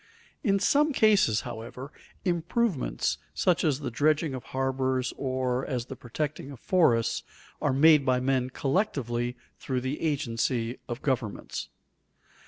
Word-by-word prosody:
In 200 -5 +3
some 290 +9 +3
cases, 205 - +4
however, 120 +4 -7 0.3
improvements 175 - 0 0.2
such 180 -3 +2
as 150 -3 +1
the 140 - -3
dredging 150 +3 +2
of 130 0 -6
harbors 130 -1 -1
or 130 -1 -1
as 125 -3 -2
the 135 - -7
protecting 140 +3 -4
of 135 -4 -10
forests, 120 -12 +2 0.4
are 145 - +2
made 150 +2 +6
by 130 -1 +2
men 130 0 +1
collectively 130 - -1 0.2
through 130 -2 -2
the 130 +3 -3
agency 125 -5 -1
of 120 +1 -5
governments. 125 -6 -2
135 Hz, 130 wpm, -28 LUFS, 125-155 Hz, 0.4 s, made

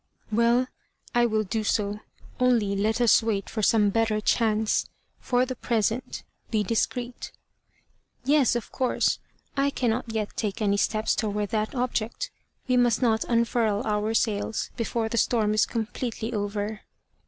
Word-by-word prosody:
"Well, 235 +3 +3 0.5
I 240 0 +4
will 215 -1 +1
do 215 +2 -2
so, 210 -1 0 0.4
only 235 -6 +3
let 215 +4 +1
us 240 -2 +5
wait 215 -3 -2
for 220 - -2
some 210 -1 +4
better 225 0 +1
chance. 220 0 +1 0.3
For 250 0 +1
the 255 0 -5
present 230 0 -1 0.3
be 215 -2 +1
discreet." 240 +3 -2 0.9
"Yes, 275 -2 +3
of 240 - -4
course. 255 -2 +1 0.4
I 275 0 +2
cannot 240 -3 -1
yet 215 -2 -3
take 205 -3 -2
any 205 -2 +2
steps 215 +1 +1
towards 210 -2 -2
that 215 +2 -1
object; 250 - -2 0.4
we 255 -1 +3
must 245 0 +3
not 225 -2 +2
unfurl 230 -3 +1
our 215 +1 0
sails 215 -1 0
before 230 -1 -1
the 230 +1 0
storm 215 -2 +2
is 215 - +3
completely 230 0 -3
over." 205 0 -3
225 Hz, 145 wpm, -26 LUFS, 215-240 Hz, 0.9 s, us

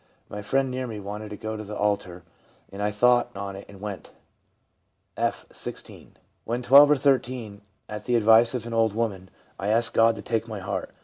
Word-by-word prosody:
My 105 - -6
friend 135 +5 0
near 130 0 -3
me 110 -3 -6
wanted 105 +2 -6
me 105 0 -8
to - - -23
go 110 0 -3
to 110 - -6
the 105 0 -7
altar, 100 -4 -1 0.5
and 100 - -7
I 105 - +1
thought 120 +4 +3
on 100 0 -5
it 100 - -10
and 100 -1 -13
went.' 100 -2 -7 1.1
F., - - -2
16. - - -8 0.3
'When 120 +2 -3
12 140 +4 +8
or 150 - +6
13, 125 -6 0 0.3
at 105 0 -7
the 125 - +1
advice 115 +2 +5
of 120 -2 -4
an 120 - -6
old 115 -2 +2
woman, 100 -5 -3 0.3
I 100 - -3
asked 115 +2 +1
God 115 0 +4
to 105 - -9
take 115 0 -1
my 110 -2 -6
heart. 95 - -4
110 Hz, 205 wpm, -25 LUFS, 105-120 Hz, 1.1 s, 12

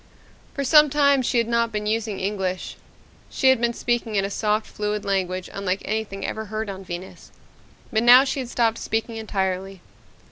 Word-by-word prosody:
For 280 - -2
some 300 +2 +6
time 280 -1 +3
she 245 - 0
had 230 -1 +2
not 235 -1 +1
been 210 -1 -3
using 215 -1 -1
English. 190 -2 -3 0.5
She 265 - +2
had 260 -3 +3
been 235 0 0
speaking 235 -2 -1
in 195 -1 +2
a 200 - -4
soft, 215 +1 0
fluid 210 0 -4
language 185 -2 -1
unlike 195 -1 -2
anything 205 -2 -3
ever 220 0 -4
heard 215 0 -4
on 195 0 -9
Venus. 180 0 -8 0.6
But 220 - +2
now 245 +2 +8
she 275 0 -2
had 250 -2 -5
stopped 230 -2 +1
speaking 225 +1 -3
entirely. 195 -3 -3
220 Hz, 180 wpm, -23 LUFS, 195-235 Hz, 0.6 s, now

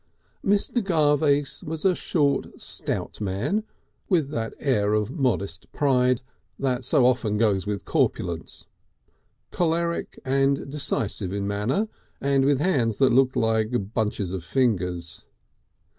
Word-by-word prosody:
Mr. 205 +4 +2
Garvace 145 -5 +2
was 160 +3 -5
a 190 - +5
short 145 -5 0
stout - - -4
man, 110 - -1 0.5
with 160 -8 +2
that 115 -6 -3
air 105 -7 +1
of 105 +2 0
modest 120 - -2
pride 125 -3 +2 0.3
that 130 -2 -1
so 130 0 +4
often 120 -4 +2
goes 105 -3 +1
with 105 -2 -3
corpulence, 85 -2 -1 0.9
choleric 170 0 -1
and 135 +1 +1
decisive 110 -9 -1
in 100 0 -2
manner, 110 - 0 0.3
and 135 -1 +2
with 140 -1 +3
hands 125 - +1
that 130 -3 +4
looked 130 0 +3
like 110 -1 0
bunches 105 -4 -1
of 95 -3 -4
fingers. 90 -8 -1
130 Hz, 125 wpm, -25 LUFS, 105-145 Hz, 0.9 s, a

